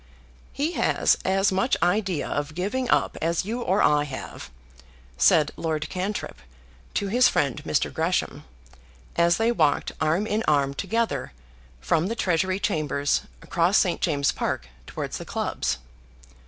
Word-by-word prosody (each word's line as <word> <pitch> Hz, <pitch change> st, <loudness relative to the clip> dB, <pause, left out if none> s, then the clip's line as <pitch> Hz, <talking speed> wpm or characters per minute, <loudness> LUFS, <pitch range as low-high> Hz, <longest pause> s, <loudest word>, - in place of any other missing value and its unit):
"He 295 Hz, +4 st, -1 dB
has -, -, +2 dB
as 195 Hz, +1 st, +2 dB
much 195 Hz, +7 st, +1 dB
idea 185 Hz, -3 st, +1 dB
of 145 Hz, +1 st, -3 dB
giving 235 Hz, +8 st, -2 dB
up -, -, +2 dB
as 165 Hz, +2 st, 0 dB
you 235 Hz, +4 st, -3 dB
or 195 Hz, -2 st, +2 dB
I 150 Hz, 0 st, +3 dB
have," 135 Hz, -3 st, -8 dB, 0.7 s
said 140 Hz, -, +4 dB
Lord 155 Hz, -2 st, -2 dB
Cantrip 185 Hz, -, -4 dB, 0.6 s
to 200 Hz, -, 0 dB
his 250 Hz, +4 st, +5 dB
friend 140 Hz, -4 st, 0 dB
Mr. 75 Hz, -, 0 dB
Gresham, -, -, -1 dB, 0.7 s
as 170 Hz, 0 st, +3 dB
they 225 Hz, +1 st, +2 dB
walked 155 Hz, -10 st, +1 dB
arm 160 Hz, +6 st, +2 dB
in 215 Hz, +1 st, -1 dB
arm 140 Hz, -2 st, +2 dB
together 195 Hz, -, -2 dB, 0.5 s
from 155 Hz, -, +1 dB
the 230 Hz, -, -2 dB
Treasury 185 Hz, -1 st, 0 dB
Chambers 150 Hz, -, 0 dB, 0.2 s
across 175 Hz, +4 st, +2 dB
St. 180 Hz, -4 st, +1 dB
James's 145 Hz, -5 st, +1 dB
Park 65 Hz, -, -3 dB, 0.2 s
towards -, -, -5 dB
the -, -, -6 dB
clubs. -, -, -2 dB
175 Hz, 140 wpm, -25 LUFS, 150-205 Hz, 0.7 s, his